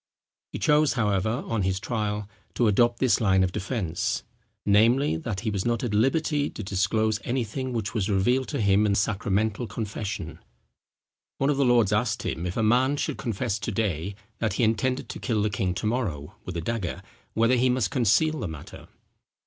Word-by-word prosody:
He -, -, -4 dB
chose, 150 Hz, -2 st, +3 dB
however, 110 Hz, -1 st, 0 dB
on 115 Hz, -2 st, -1 dB
his 95 Hz, 0 st, 0 dB
trial, 105 Hz, -2 st, -2 dB, 0.3 s
to 120 Hz, -, +2 dB
adopt 120 Hz, +3 st, +3 dB
this 130 Hz, -2 st, +2 dB
line 95 Hz, -3 st, +4 dB
of 90 Hz, -, 0 dB
defence, 90 Hz, -4 st, -2 dB, 0.4 s
namely, 115 Hz, -, +4 dB
that 95 Hz, +4 st, -4 dB
he 110 Hz, -1 st, -1 dB
was 100 Hz, -2 st, -1 dB
not 120 Hz, 0 st, 0 dB
at 120 Hz, -4 st, -2 dB
liberty 145 Hz, +6 st, +1 dB
to 110 Hz, -, -7 dB
disclose 105 Hz, +3 st, +1 dB
anything 130 Hz, +1 st, -2 dB
which 110 Hz, -3 st, -3 dB
was 110 Hz, -3 st, -1 dB
revealed 120 Hz, +7 st, +2 dB
to 140 Hz, -, -3 dB
him 100 Hz, +1 st, +3 dB
in 100 Hz, -, +2 dB
sacramental 105 Hz, +2 st, 0 dB
confession. 105 Hz, -2 st, -5 dB, 1.0 s
One 135 Hz, +2 st, +2 dB
of 140 Hz, -, -1 dB
the 140 Hz, -, +3 dB
lords 120 Hz, -5 st, +4 dB
asked 115 Hz, +2 st, 0 dB
him 90 Hz, -4 st, -3 dB
if 90 Hz, -, -4 dB
a 110 Hz, -, +1 dB
man 130 Hz, +6 st, +3 dB
should -, -, -2 dB
confess 115 Hz, -3 st, -2 dB
to 105 Hz, +3 st, -3 dB
day, 95 Hz, -3 st, -2 dB, 0.2 s
that 110 Hz, -4 st, 0 dB
he 120 Hz, -, 0 dB
intended 115 Hz, +4 st, +1 dB
to -, -, -6 dB
kill 110 Hz, -4 st, 0 dB
the 105 Hz, -, 0 dB
king 95 Hz, -2 st, -1 dB
to 95 Hz, -, -4 dB
morrow 105 Hz, -, -2 dB
with 90 Hz, -2 st, -5 dB
a -, -, -2 dB
dagger, 105 Hz, 0 st, -3 dB, 0.3 s
whether 115 Hz, +3 st, +3 dB
he 125 Hz, +1 st, +3 dB
must 125 Hz, -1 st, +1 dB
conceal 140 Hz, +5 st, +2 dB
the 105 Hz, -, -3 dB
matter? 80 Hz, -3 st, -10 dB
110 Hz, 190 wpm, -26 LUFS, 100-120 Hz, 1.0 s, line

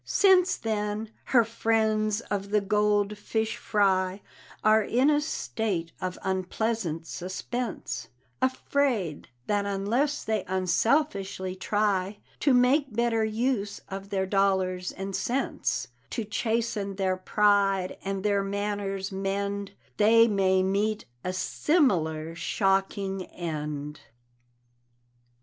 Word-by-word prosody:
Since 375 Hz, -2 st, +4 dB
then, 215 Hz, 0 st, -2 dB
her 240 Hz, -3 st, +5 dB
friends 220 Hz, -1 st, +1 dB
of 200 Hz, -3 st, -4 dB
the 210 Hz, +1 st, +3 dB
gold 210 Hz, 0 st, +1 dB
fish 220 Hz, +1 st, -1 dB
fry 190 Hz, -2 st, +1 dB, 0.4 s
Are 215 Hz, 0 st, +5 dB
in 255 Hz, +7 st, +3 dB
a 295 Hz, 0 st, +3 dB
state 205 Hz, -, -2 dB
of 185 Hz, -1 st, -3 dB
unpleasant 190 Hz, -2 st, -1 dB
suspense, 185 Hz, -, -4 dB, 0.3 s
Afraid, 260 Hz, -, 0 dB, 0.2 s
that 205 Hz, -1 st, 0 dB
unless 230 Hz, +9 st, 0 dB
they 215 Hz, -3 st, -1 dB
unselfishly 190 Hz, -, 0 dB
try 200 Hz, 0 st, 0 dB, 0.2 s
To 285 Hz, -, +3 dB
make 255 Hz, +3 st, +4 dB
better 235 Hz, -1 st, +2 dB
use 220 Hz, -1 st, -1 dB
of 195 Hz, 0 st, -6 dB
their 190 Hz, -1 st, 0 dB
dollars 190 Hz, -2 st, +1 dB
and 195 Hz, 0 st, -5 dB
sense 260 Hz, +3 st, -1 dB, 0.2 s
To 230 Hz, -, -3 dB
chasten 215 Hz, -1 st, -1 dB
their 190 Hz, -1 st, +1 dB
pride, 195 Hz, -1 st, +2 dB
and 195 Hz, 0 st, -3 dB
their 200 Hz, -1 st, +2 dB
manners 200 Hz, -1 st, -2 dB
mend, 200 Hz, +1 st, -2 dB, 0.2 s
They 230 Hz, +2 st, +6 dB
may 190 Hz, -3 st, +3 dB
meet 205 Hz, +3 st, 0 dB, 0.2 s
a 180 Hz, -, -1 dB
similar 180 Hz, -, +1 dB
shocking 195 Hz, +1 st, 0 dB
end. 150 Hz, -3 st, -5 dB
200 Hz, 110 wpm, -27 LUFS, 190-220 Hz, 0.4 s, They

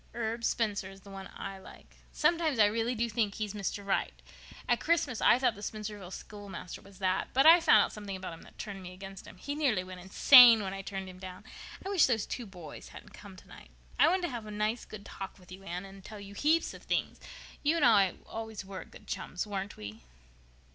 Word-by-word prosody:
Herb 230 Hz, 0 st, -3 dB
Spencer 205 Hz, -5 st, 0 dB
is 195 Hz, 0 st, -13 dB
the 200 Hz, -, -13 dB
one 195 Hz, -1 st, -8 dB
I 195 Hz, -1 st, -7 dB
like. -, -, -15 dB
Sometimes 330 Hz, -5 st, +2 dB
I 215 Hz, -, +7 dB
really 225 Hz, +4 st, 0 dB
do 235 Hz, +1 st, 0 dB
think 215 Hz, -2 st, -1 dB
he's 210 Hz, -2 st, -3 dB
Mr. 205 Hz, 0 st, -4 dB
Right. 195 Hz, -, -1 dB, 0.5 s
At -, -, +2 dB
Christmas 330 Hz, -8 st, 0 dB
I -, -, +6 dB
thought 250 Hz, -2 st, +2 dB
the 205 Hz, -, -12 dB
Spencervale 210 Hz, -3 st, -6 dB
schoolmaster 200 Hz, -2 st, -8 dB
was 195 Hz, -1 st, -16 dB
that. 185 Hz, -1 st, 0 dB
But 270 Hz, +2 st, +5 dB
I 330 Hz, +2 st, +10 dB
found 215 Hz, -11 st, +6 dB
out -, -, -4 dB
something 205 Hz, -2 st, -6 dB
about 185 Hz, -2 st, -6 dB
him 165 Hz, -, -11 dB
that -, -, -17 dB
turned 200 Hz, -3 st, -6 dB
me 180 Hz, 0 st, -9 dB
against 195 Hz, +1 st, -10 dB
him. -, -, -12 dB
He 285 Hz, +10 st, -5 dB
nearly 270 Hz, -11 st, +1 dB
went 185 Hz, 0 st, -9 dB
insane 230 Hz, +4 st, +8 dB
when 190 Hz, -1 st, -4 dB
I 195 Hz, -, -5 dB
turned 195 Hz, -1 st, -6 dB
him 185 Hz, 0 st, -11 dB
down. 185 Hz, -1 st, -9 dB, 0.4 s
I -, -, -3 dB
wish 390 Hz, -5 st, +5 dB
those 225 Hz, -5 st, +1 dB
two 240 Hz, -3 st, -5 dB
boys 180 Hz, -5 st, -10 dB
hadn't -, -, -13 dB
come 200 Hz, -2 st, -12 dB
tonight. 185 Hz, -, -14 dB, 0.3 s
I -, -, +7 dB
wanted 370 Hz, 0 st, +2 dB
to 350 Hz, -, 0 dB
have 235 Hz, -4 st, -6 dB
a -, -, -7 dB
nice 215 Hz, +2 st, -1 dB
good 205 Hz, -1 st, -10 dB
talk 195 Hz, -, -8 dB
with 180 Hz, -2 st, -18 dB
you, 185 Hz, +1 st, -10 dB
Anne, 180 Hz, 0 st, -5 dB
and 195 Hz, 0 st, -13 dB
tell 215 Hz, +1 st, -9 dB
you 200 Hz, 0 st, -10 dB
such -, -, -8 dB
heaps 320 Hz, +3 st, +2 dB
of -, -, -11 dB
things. -, -, -2 dB, 0.4 s
You 305 Hz, +3 st, +2 dB
and 315 Hz, -5 st, +3 dB
I 200 Hz, -5 st, +5 dB
were -, -, -22 dB
always 220 Hz, -2 st, -6 dB
good 190 Hz, -1 st, -10 dB
chums, 190 Hz, -1 st, -4 dB
weren't 200 Hz, -1 st, -5 dB
we?" 105 Hz, +1 st, -8 dB
205 Hz, 230 wpm, -31 LUFS, 190-230 Hz, 0.5 s, I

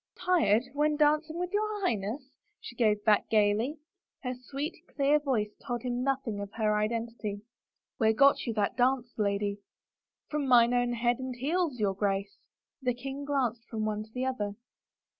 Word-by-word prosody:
" -, -, -30 dB
Tired 295 Hz, -, +3 dB
— -, -, -24 dB
when 300 Hz, +1 st, +2 dB
dancing 305 Hz, +2 st, +2 dB
with 360 Hz, 0 st, -2 dB
your 425 Hz, 0 st, 0 dB
Highness? 230 Hz, -, -2 dB
" 415 Hz, 0 st, -46 dB
she 240 Hz, -, -10 dB
gave 215 Hz, -3 st, +2 dB, 0.3 s
gayly 215 Hz, +5 st, +2 dB, 0.5 s
back. 250 Hz, -1 st, -2 dB
Her 250 Hz, -, -12 dB
sweet, 295 Hz, +5 st, -4 dB, 0.2 s
clear 285 Hz, +1 st, +4 dB
voice 240 Hz, -8 st, 0 dB
told 240 Hz, -3 st, -3 dB
him 245 Hz, -1 st, -2 dB
noth 270 Hz, 0 st, -1 dB
ing 210 Hz, -2 st, -2 dB
of 200 Hz, 0 st, -6 dB
her 215 Hz, -2 st, +1 dB
identity. 215 Hz, -1 st, -2 dB, 0.3 s
" -, -, -59 dB
Where 220 Hz, -2 st, +4 dB
got 275 Hz, +4 st, +4 dB
you 230 Hz, -, 0 dB
that 205 Hz, -2 st, 0 dB
dance, 250 Hz, -1 st, +1 dB
lady? 200 Hz, 0 st, 0 dB, 0.2 s
" -, -, -63 dB
" -, -, -63 dB
From 295 Hz, -2 st, -1 dB
mine 240 Hz, -1 st, +6 dB
own 245 Hz, 0 st, +2 dB
head 240 Hz, +1 st, +1 dB
and 260 Hz, -1 st, -4 dB
heels, 295 Hz, +1 st, -1 dB
your 200 Hz, -2 st, +1 dB
Grace." 200 Hz, 0 st, -1 dB, 0.5 s
The 250 Hz, -2 st, 0 dB
king 270 Hz, +3 st, -6 dB
glanced 245 Hz, -5 st, -1 dB
from 220 Hz, -2 st, -2 dB
one 215 Hz, -1 st, -1 dB
to 215 Hz, 0 st, -11 dB
the 250 Hz, +2 st, -2 dB
other. 210 Hz, -6 st, -2 dB
245 Hz, 195 wpm, -30 LUFS, 215-275 Hz, 0.5 s, mine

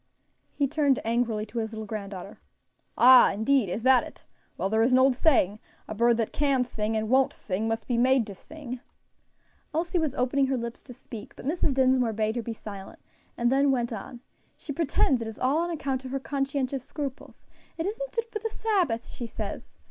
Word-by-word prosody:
He 280 Hz, -, +1 dB
turned 280 Hz, -1 st, +2 dB
angrily 230 Hz, -2 st, 0 dB
to 225 Hz, +2 st, -5 dB
his 220 Hz, 0 st, -3 dB
little 220 Hz, 0 st, -5 dB
granddaughter. 200 Hz, -3 st, -7 dB, 0.6 s
"Ah! 250 Hz, +2 st, +8 dB
indeed, 220 Hz, +1 st, +2 dB
is 220 Hz, +5 st, -3 dB
that 260 Hz, -1 st, +5 dB
it? -, -, -12 dB, 0.3 s
Well, -, -, 0 dB
there 220 Hz, +2 st, +1 dB
is 245 Hz, +3 st, +3 dB
an -, -, +7 dB
old 260 Hz, 0 st, +5 dB
saying. 230 Hz, -, +3 dB, 0.3 s
'A -, -, -5 dB
bird 235 Hz, +2 st, +3 dB
that 225 Hz, -2 st, -1 dB
can 275 Hz, -3 st, +2 dB
sing, 220 Hz, -2 st, -2 dB
and 220 Hz, 0 st, -1 dB
won't 260 Hz, +3 st, +3 dB
sing, 205 Hz, +3 st, -3 dB
must 225 Hz, 0 st, -2 dB
be 245 Hz, -, 0 dB
made 255 Hz, -1 st, +4 dB
to 205 Hz, -, -8 dB
sing.'" 255 Hz, +3 st, -9 dB, 1.0 s
Elsie 345 Hz, +2 st, 0 dB
was 310 Hz, -4 st, -1 dB
opening 265 Hz, +2 st, +1 dB
her 265 Hz, -1 st, 0 dB
lips 235 Hz, -1 st, -5 dB
to 250 Hz, -, -10 dB
speak, 230 Hz, -3 st, -10 dB
but -, -, -11 dB
Mrs. 295 Hz, -2 st, 0 dB
Dinsmore 255 Hz, -3 st, +3 dB
bade 215 Hz, +1 st, -1 dB
her 240 Hz, -, -1 dB
be 230 Hz, -, -5 dB
silent, 200 Hz, -3 st, -9 dB, 0.4 s
and 240 Hz, +1 st, +2 dB
then 275 Hz, +1 st, +3 dB
went 240 Hz, -3 st, 0 dB
on. 235 Hz, +3 st, -8 dB, 0.4 s
"She 290 Hz, -, -6 dB
pretends 275 Hz, -4 st, +1 dB
it 225 Hz, -, -4 dB
is 220 Hz, -, -7 dB
all 270 Hz, +5 st, +1 dB
on 345 Hz, +1 st, -1 dB
account 270 Hz, -5 st, -2 dB
of 265 Hz, +1 st, -4 dB
conscientious 275 Hz, -2 st, -2 dB
scruples. 275 Hz, -2 st, -7 dB, 0.3 s
'It 325 Hz, -, -2 dB
isn't -, -, -4 dB
fit 460 Hz, -1 st, -1 dB
for 430 Hz, -, -3 dB
the 450 Hz, +2 st, -3 dB
Sabbath,' 370 Hz, -, 0 dB
she 240 Hz, -, -6 dB
says. 215 Hz, -2 st, -7 dB
255 Hz, 200 wpm, -27 LUFS, 225-275 Hz, 1.0 s, Ah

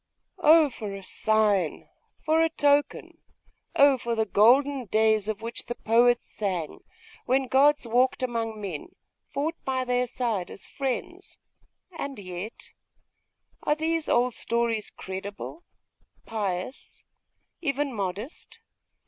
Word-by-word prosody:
'Oh 315 Hz, -3 st, +6 dB
for 210 Hz, -4 st, -6 dB
a 195 Hz, -, -9 dB
sign, 205 Hz, -4 st, +1 dB, 0.4 s
for 315 Hz, +1 st, +3 dB
a 325 Hz, -, +3 dB
token! 290 Hz, -2 st, +1 dB, 0.6 s
Oh 280 Hz, -2 st, +6 dB
for 235 Hz, 0 st, -2 dB
the 220 Hz, -1 st, +1 dB
golden 255 Hz, +7 st, +4 dB
days 215 Hz, 0 st, +2 dB
of 220 Hz, 0 st, -3 dB
which 230 Hz, +1 st, -4 dB
the 240 Hz, -, -3 dB
poets 240 Hz, +2 st, +3 dB
sang, 185 Hz, -7 st, -3 dB, 0.5 s
when 265 Hz, +1 st, +2 dB
gods 275 Hz, +1 st, +3 dB
walked 250 Hz, +3 st, +2 dB
among 230 Hz, -3 st, -2 dB
men, 185 Hz, -8 st, -6 dB, 0.4 s
fought 305 Hz, +4 st, -1 dB
by 260 Hz, -1 st, -1 dB
their 250 Hz, 0 st, +1 dB
side 225 Hz, -7 st, -2 dB
as -, -, -9 dB
friends! 315 Hz, +8 st, -5 dB, 0.5 s
And 280 Hz, -5 st, -6 dB
yet.... 185 Hz, +2 st, -8 dB, 0.9 s
are 295 Hz, -, +1 dB
these 320 Hz, 0 st, -1 dB
old 245 Hz, 0 st, +3 dB
stories 235 Hz, -2 st, -1 dB
credible, 200 Hz, -, -7 dB, 0.6 s
pious, 205 Hz, +1 st, -5 dB, 0.6 s
even 280 Hz, -3 st, -1 dB
modest? 205 Hz, -, -5 dB
235 Hz, 120 wpm, -26 LUFS, 210-280 Hz, 0.9 s, Oh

